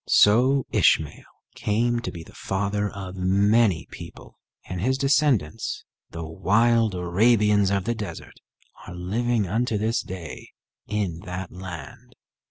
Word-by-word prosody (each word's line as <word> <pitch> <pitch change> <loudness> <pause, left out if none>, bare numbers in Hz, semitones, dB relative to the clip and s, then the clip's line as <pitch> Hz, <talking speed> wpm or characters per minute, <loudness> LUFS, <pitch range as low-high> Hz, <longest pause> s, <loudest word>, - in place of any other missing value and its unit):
So 130 +6 +5
Ishmael 75 -2 +2 0.2
came 120 +3 0
to 105 -6 -5
be 85 -2 -8
the - - -16
father 100 +1 -2
of 95 -2 -8
many 100 +1 +2
people, - - -11 0.3
and 90 +1 -5
his 130 +5 +1
descendants, 135 - +1 0.3
the 85 0 -6
wild 110 +6 +2
Arabians 105 +3 +3
of 100 -1 0
the 120 - -1
desert, 105 -7 -8 0.5
are 90 - -8
living 110 +5 0
unto 110 +4 0
this 110 +3 0
day 90 -4 -9 0.3
in 100 -6 -2
that 90 0 -6
land. 90 -6 -9
100 Hz, 130 wpm, -24 LUFS, 90-115 Hz, 0.5 s, So